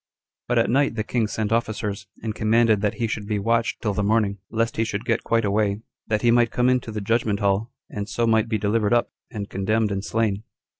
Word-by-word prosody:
4. 120 - +1
But - - +2
at - - -3
night 140 -1 +2
the 110 - -1
king 115 0 0
sent 110 0 -2
officers, 110 -3 -1 0.2
and 110 -1 -2
commanded 110 -1 +3
that 105 -1 0
he 120 - -1
should 110 -2 -4
be 105 -1 0
watched 115 +3 0
till 105 -3 0
the 105 - -1
morning, 100 -1 +1
lest 115 0 -1
he 110 - +2
should 105 -2 -4
get - - 0
quite 115 -1 +1
away, 100 0 +1 0.3
that 110 0 0
he 120 - +5
might 120 -1 +4
come 125 +3 +2
into 125 -3 0
the 105 -1 -4
judgment 110 -1 0
hall, 100 +3 0 0.2
and 105 0 -5
so 120 - 0
might 110 0 +2
be 110 - +1
delivered 105 +2 +1
up, 120 - +1 0.2
and 105 -3 -5
condemned 105 +2 0
and 100 -1 -2
slain. 110 -2 0
110 Hz, 235 wpm, -23 LUFS, 105-115 Hz, 0.3 s, he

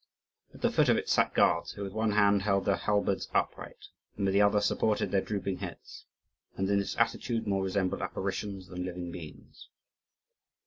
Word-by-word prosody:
At - - -15
the - - +3
foot - - +3
of - - +5
it - - -3
sat - - +2
guards, - - +3
who 100 - -6
with 95 -1 -6
one 110 -1 0
hand 100 -1 +4
held 100 -1 +1
their 100 - +3
halberds 100 -2 0
upright, - - -2 0.3
and 100 - -1
with 95 - +1
the 100 - +4
other 105 0 +4
supported 105 +1 +1
their 95 - +2
drooping 100 -2 -3
heads, 90 -3 -9 0.5
and 95 - 0
in 100 0 +2
this 100 - -3
attitude 115 -1 0
more 100 -2 0
resembled 95 -1 -1
apparitions 95 0 -4
than 90 -1 -5
living 90 -1 -5
beings. 80 -3 -11
100 Hz, 185 wpm, -30 LUFS, 95-105 Hz, 0.5 s, of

